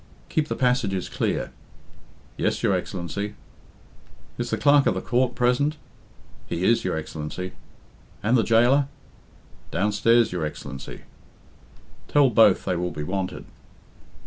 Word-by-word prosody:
"Keep 155 -1 0
the - - -2
passages 125 -8 +1
clear." - - -2 0.8
"Yes, - - -1
your 100 - +3
Excellency." 95 +3 -3 1.0
"Is 120 0 -2
the - - 0
Clerk 145 -1 +5
of - - +2
the - - -2
Court 125 0 0
present?" 125 +5 +1 0.7
"He 85 - -3
is, 115 +4 +3
your 90 -3 -1
Excellency." 80 +4 -5 0.7
"And 115 +5 +3
the 120 - +5
jailor?" 120 +5 +4 0.8
"Downstairs, 110 +4 +2
your 90 -3 -2
Excellency." 70 -3 -7 1.1
"Tell 140 -3 +4
both 105 -4 +5
they 90 - 0
will 90 +1 -1
be 75 - -5
wanted." 95 +3 -3
105 Hz, 125 wpm, -24 LUFS, 90-125 Hz, 1.1 s, Clerk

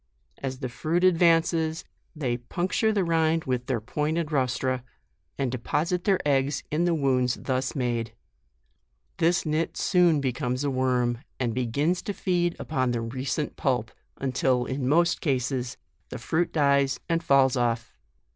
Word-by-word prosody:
As 130 -1 -4
the 130 - -2
fruit 160 +8 -1
advances, 165 -2 +3 0.3
they 130 -6 -1
puncture 180 - 0
the 205 -3 +1
rind 165 -1 +2
with 125 -1 -2
their 130 -4 0
pointed 150 +7 -2
rostra, 130 -2 0 0.5
and 135 -3 -1
deposit 165 +8 -1
their 195 -2 +3
eggs 140 0 +1
in 160 +3 +1
the 175 -1 +2
wounds 130 -4 +1
thus 130 0 -2
made. 120 -3 -2 1.0
This 170 +1 +2
nit 155 +2 -1
soon 175 -5 +3
becomes 125 -1 -1
a 140 - 0
worm, 125 -2 +1 0.2
and 120 -3 0
begins 140 +9 0
to 205 - -4
feed 175 -3 0
upon 130 -5 -1
the 120 - -1
recent 130 +3 -3
pulp, - - 0 0.3
until, 130 -2 +1
in 130 -1 -2
most 170 +3 +3
cases, 130 -3 -1 0.3
the - - -6
fruit 160 +9 -1
dies 140 -2 +2
and 165 0 +1
falls 135 -3 +4
off. 120 -2 -1
140 Hz, 145 wpm, -26 LUFS, 125-165 Hz, 1.0 s, falls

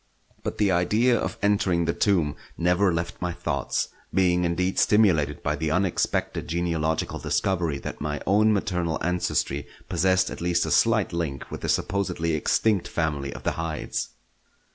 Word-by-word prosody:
But - - -4
the 100 -2 +2
idea 105 +8 +3
of - - -2
entering 95 -4 +2
the 85 - +1
tomb 85 -8 +1 0.2
never 90 +3 +3
left 85 0 -3
my 90 -1 -1
thoughts; 75 -6 -2 0.2
being 90 -2 +2
indeed 90 +2 0
stimulated 85 -9 +3
by 75 - 0
the 75 +1 -2
unexpected 90 +2 0
genealogical 80 -2 -1
discovery 85 -6 0
that - - -7
my 75 0 -2
own 105 +3 +4
maternal 90 -5 0
ancestry 85 -5 -1 0.2
possessed 95 0 +2
at - - -7
least 85 0 +1
a - - -3
slight 110 -5 +3
link 80 -6 -3
with - - -6
the - - -3
supposedly 90 -4 0
extinct 95 +6 +1
family 75 -4 -2
of - - -9
the - - +1
Hydes. 80 -1 -3
85 Hz, 155 wpm, -25 LUFS, 80-95 Hz, 0.2 s, own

